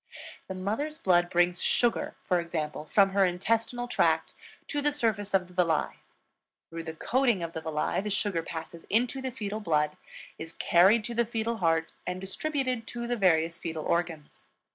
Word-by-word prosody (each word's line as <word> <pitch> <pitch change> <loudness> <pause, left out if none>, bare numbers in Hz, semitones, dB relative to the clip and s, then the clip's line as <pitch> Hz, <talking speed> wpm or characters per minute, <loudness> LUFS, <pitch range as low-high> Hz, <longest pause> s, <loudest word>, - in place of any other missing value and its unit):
The 190 - -5
mother's 225 +12 -2
blood 175 - +3
brings 175 0 +2
sugar, 240 -1 +1
for 180 - +2
example, 155 -3 -3
from 195 +4 +4
her 195 0 +3
intestinal 225 +7 0
tract 245 - +1 0.4
to 290 - -1
the 295 +1 +2
surface 220 -7 0
of 185 -1 +2
the 180 - -17
villi; 170 -3 +1 0.7
through 165 0 -6
the 160 -1 -6
coating 240 -1 +1
of 165 0 -5
the 160 - -4
villi 160 +2 -1
the 210 - -4
sugar 200 -4 0
passes 165 0 -7
into 245 +5 +1
the 260 - -2
fetal 215 -4 -4
blood, 150 -6 0 0.4
is 160 0 -7
carried 195 +6 +4
to 235 - -5
the 235 0 +2
fetal 230 0 -2
heart, 165 -3 +1 0.2
and 180 0 -2
distributed 255 +3 -2
to 235 0 -4
the 245 +1 -1
various 170 -5 +2
fetal 160 -2 -4
organs. 170 -3 -2
190 Hz, 175 wpm, -29 LUFS, 165-230 Hz, 0.7 s, from